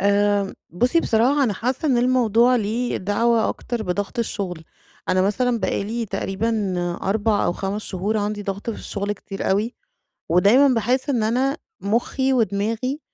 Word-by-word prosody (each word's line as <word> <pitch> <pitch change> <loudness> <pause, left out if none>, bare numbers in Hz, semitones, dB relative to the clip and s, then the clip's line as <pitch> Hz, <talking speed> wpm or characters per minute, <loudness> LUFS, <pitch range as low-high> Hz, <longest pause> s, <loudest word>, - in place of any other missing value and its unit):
آآ، 200 0 +2 0.2
بُصّي 245 - +2
بصراحة، 260 +3 +2
أنا 220 - +1
حاسّة 255 +9 -2
إن 255 -3 +3
الموضوع 245 -1 +3
ليه 230 +3 -1
دعوة 225 +4 +1
أكتر 240 -2 -4
بضغط 205 +3 -3
الشغل، 185 -7 -3 0.4
أنا 185 0 +3
مثلًا 235 +4 +1
بقى 200 - -1
لي 230 +2 -3
تقريبًا 205 +1 -1 0.3
4 210 +1 +1
أو - - +1
5 200 +3 -3
شهور 200 +3 -2
عندي 205 0 -2
ضغط 200 +3 -4
في 220 - -5
الشغل 200 0 -2
كتير 195 -1 -5
أوي، 210 +5 0 0.6
ودايمًا 245 +10 +5
باحس 250 +5 0
إن 240 -5 +1
أنا 255 +6 +1 0.2
مُخّي 245 +5 0
ودماغي 230 +4 0
220 Hz, 150 wpm, -22 LUFS, 200-245 Hz, 0.6 s, ودايمًا